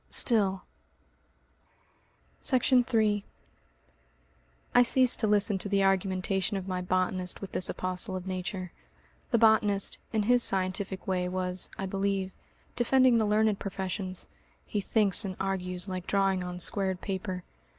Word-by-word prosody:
Still 195 -6 +3 1.8
Section 255 -1 +3
3 215 -3 +1 1.5
I 245 - +7
ceased 250 +1 +3
to 220 - +1
listen 205 -1 +2
to 200 - -1
the 200 -1 +2
argumentation 190 0 +1
of 190 0 -6
my 185 -1 -2
botanist 185 0 -1
with 195 - -8
this 185 - +2
apostle 185 +2 -2
of 185 -1 -5
Nature. 185 -1 -4 0.6
The 235 - +3
botanist, 215 -3 +3
in 220 -2 +1
his 245 +3 +4
scientific 190 -1 -1
way, 180 -1 -1
was, 180 0 -2
I 195 - -3
believe, 195 0 -1 0.4
defending 255 0 +4
the 220 - +2
learned 210 -1 +2
professions. 190 -1 -4 0.4
(He 205 - -2
thinks 205 0 +2
and 190 -2 -4
argues 185 -1 -3
like 185 -1 -5
drawing 195 -2 +1
on 180 0 -6
squared 190 0 -1
paper.) 185 -2 -4
195 Hz, 135 wpm, -29 LUFS, 185-210 Hz, 1.8 s, I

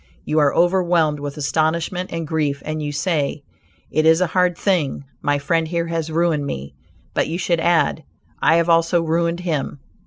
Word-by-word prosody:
You 155 - +1
are 145 -2 +4
overwhelmed 175 -4 +2
with 145 +1 -6
astonishment 160 +5 -1
and 165 -1 -3
grief, 150 -3 -1
and 155 0 -3
you 145 -1 -3
say 145 -2 -1 0.5
"it 155 - +2
is 160 +1 +5
a 185 - +3
hard 180 0 +1
thing; 170 -9 0 0.2
my 145 0 +1
friend 160 +3 0
here 170 0 -1
has 165 -1 -3
ruined 160 -3 +1
me," 70 - -6 0.4
but, - - +1
you 165 - -3
should 175 -2 0
add, 165 -1 +2 0.4
"I 160 - +4
have 170 0 +2
also 165 0 +3
ruined 170 +1 0
him." 155 -5 -3
160 Hz, 180 wpm, -20 LUFS, 150-170 Hz, 0.5 s, is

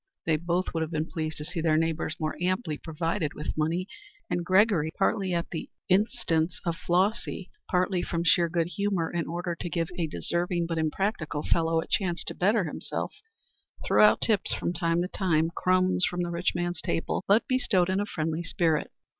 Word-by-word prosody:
They 160 - +3
both 170 +3 -1
would 165 - -1
have 160 - -1
been 155 -1 -1
pleased 155 -2 -3
to 150 - -5
see 165 +1 -4
their 160 -1 +3
neighbors 165 0 0
more 155 -1 -2
amply 185 -2 0
provided 160 -1 -2
with 150 - -4
money, 165 +4 0 0.4
and 175 - 0
Gregory, 185 -3 +3
partly 195 -1 +1
at 170 -1 -1
the 160 - -5 0.2
instance 180 -4 +1
of 170 -1 0
Flossy, 190 +3 0 0.2
partly 180 0 +1
from 170 -1 -2
sheer 170 0 +4
good 165 0 +1
humor 185 -2 -1
in 170 -1 -1
order 175 +1 -3
to 175 +1 -5
give 165 0 -1
a 165 - +1
deserving 170 - -1
but 165 -1 -2
impractical 155 -2 -1
fellow 165 -1 +2
a - - -7
chance 180 -3 0
to - - -3
better 205 +3 +2
himself, 160 - -4 0.7
threw - - +4
out 210 - +6
tips 215 -4 +1
from 175 - -2
time 170 0 +1
to - - -2
time 165 -4 +1
crumbs 185 0 +2
from 175 0 -2
the 175 - -3
rich 170 +1 0
man's 175 -1 -2
table, 165 - -1
but 205 +4 +4
bestowed 220 -8 +2
in 190 +1 +1
a 205 - -1
friendly 160 -2 -2
spirit. 170 -3 0
170 Hz, 190 wpm, -28 LUFS, 160-185 Hz, 0.7 s, out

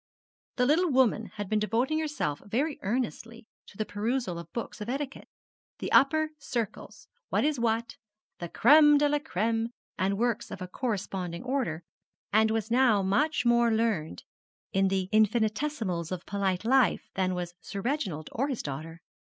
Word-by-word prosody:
The 250 - +2
little 330 +6 +3
woman 255 -5 +2
had 205 -2 -4
been 215 +2 +1
devoting 240 +8 0
herself 290 - -2
very 270 +9 -1
earnestly 230 +1 -3 0.2
to 195 - -15
the 215 - -1
perusal 210 -3 -2
of 170 - -10
books 235 -2 -6
of 210 - -5
etiquette 275 +1 -4 0.5
'The - - -5
Upper 310 +3 +4
Circles,' 230 -6 -5 0.2
'What - - +1
is 300 -4 0
What,' 230 0 -1 0.4
'The 175 - -5
Crême 295 - +6
de 295 0 +3
la 295 0 +1
Crême,' 225 - -1 0.3
and 195 +1 +1
works 235 0 0
of - - -7
a 185 - -5
corresponding 190 -5 -3
order, 250 - -2 0.5
and 220 +1 +5
was 225 0 -2
now 235 -5 +4
much 250 +8 +1
more 235 0 +4
learned 220 - -1 0.5
in 195 0 +3
the 190 -1 0
infinitesimals 215 - +1
of 185 -2 -4
polite 195 -1 -1
life 250 -5 +3
than 185 -1 0
was 175 -1 -4
Sir 200 - -6
Reginald 195 - -2
or 270 +5 -1
his 265 -5 -3
daughter. 160 +4 -6
225 Hz, 160 wpm, -28 LUFS, 190-260 Hz, 0.5 s, Crême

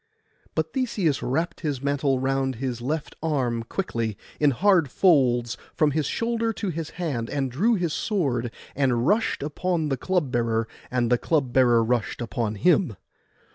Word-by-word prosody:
But - - -1
Theseus 210 - 0
wrapt 165 +6 -1
his 145 -5 -2
mantle 140 -1 +1
round 135 0 0
his 125 0 -3
left 150 +5 -3
arm 130 -7 0
quickly, 115 - -3 0.2
in 150 - +5
hard 175 +1 +3
folds, 125 - +3 0.2
from 155 -2 +3
his 150 -1 0
shoulder 230 0 0
to 205 -2 -3
his 165 -2 -4
hand, 140 -10 -2
and 135 -3 -1
drew 215 - +2
his 175 -5 -1
sword, 135 - 0 0.3
and 125 -3 +1
rushed 215 -2 +1
upon 160 +1 -1
the 135 - 0
club 175 -2 0
bearer, 115 -2 0 0.2
and 120 -1 0
the 120 - +4
club 140 -7 0
bearer 120 -3 +5
rushed 120 -1 -1 0.2
on 110 -3 0
him. 170 - +3
140 Hz, 160 wpm, -25 LUFS, 120-170 Hz, 0.3 s, in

